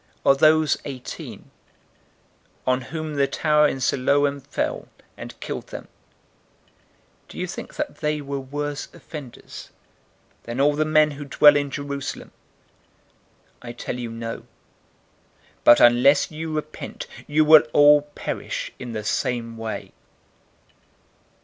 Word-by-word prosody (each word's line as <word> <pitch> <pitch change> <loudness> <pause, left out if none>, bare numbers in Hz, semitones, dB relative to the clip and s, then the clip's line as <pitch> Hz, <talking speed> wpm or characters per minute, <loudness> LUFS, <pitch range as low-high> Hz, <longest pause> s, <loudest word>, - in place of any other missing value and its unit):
013:004 - - -37 0.2
Or 135 - +5
those 155 +2 +4
eighteen, 130 -3 -8 1.1
on 130 0 +1
whom 155 -1 -5
the 140 -1 +3
tower 150 0 +3
in 135 - -3
Siloam 140 +2 +1
fell, - - -3 0.3
and - - -10
killed - - -6
them; - - -9 1.4
do - - -12
you - - -2
think - - -8
that - - -4
they 150 0 -1
were 140 -1 -4
worse 145 +2 -4
offenders 145 -6 -10 0.8
than 120 +2 -5
all 145 +2 +4
the 155 +1 +1
men 155 -1 +4
who 145 0 -8
dwell 145 +1 +6
in 145 -1 0
Jerusalem? 140 0 -5 1.3
013:005 120 - -9
I - - -4
tell 120 +1 -5
you, 120 -1 -4
no, 115 0 -6 1.2
but, 120 - +8
unless 125 +6 +5
you 160 +1 -5
repent, 155 0 -6 0.2
you 155 +1 +3
will 155 0 +9
all 145 0 +7
perish - - -4
in 120 -2 -7
the 110 -1 -4
same 115 +1 -2
way." 115 -1 -6
140 Hz, 130 wpm, -23 LUFS, 125-150 Hz, 1.4 s, will